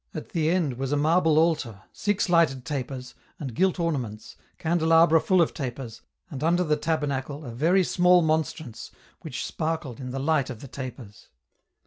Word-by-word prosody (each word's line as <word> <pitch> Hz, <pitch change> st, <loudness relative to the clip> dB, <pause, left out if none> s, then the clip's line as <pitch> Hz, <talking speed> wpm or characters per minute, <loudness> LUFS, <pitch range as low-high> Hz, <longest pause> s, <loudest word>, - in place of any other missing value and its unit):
At -, -, -6 dB
the 160 Hz, -2 st, 0 dB
end 160 Hz, -8 st, 0 dB
was 135 Hz, 0 st, -2 dB
a 145 Hz, -, +2 dB
marble 160 Hz, +1 st, +3 dB
a 165 Hz, +1 st, +5 dB
Itar, 110 Hz, -8 st, -9 dB
six 205 Hz, -1 st, 0 dB
lighted 165 Hz, -7 st, +2 dB
tapers, 130 Hz, -3 st, -5 dB, 0.3 s
and 135 Hz, -5 st, -5 dB
gilt 185 Hz, +8 st, +1 dB
ornaments, 130 Hz, -11 st, -3 dB, 0.2 s
can 170 Hz, +2 st, 0 dB
delabra 165 Hz, 0 st, +5 dB
full 185 Hz, -2 st, +4 dB
of -, -, -3 dB
tapers, 120 Hz, -4 st, -6 dB, 0.3 s
and 140 Hz, -1 st, -5 dB
under 175 Hz, +3 st, +3 dB
the 155 Hz, -3 st, +1 dB
tabernacle, 150 Hz, -2 st, -2 dB
a 120 Hz, -, -6 dB
very 165 Hz, +11 st, +3 dB
small 180 Hz, 0 st, +4 dB
monstrance, 155 Hz, -6 st, -2 dB, 0.3 s
which -, -, -5 dB
sparkled 155 Hz, -6 st, -3 dB
in 130 Hz, -1 st, -6 dB
the 130 Hz, -, -4 dB
light 140 Hz, -1 st, +1 dB
of 120 Hz, -4 st, -7 dB
the 140 Hz, -, -9 dB
tapers. 125 Hz, -5 st, -9 dB
150 Hz, 175 wpm, -26 LUFS, 130-165 Hz, 0.3 s, a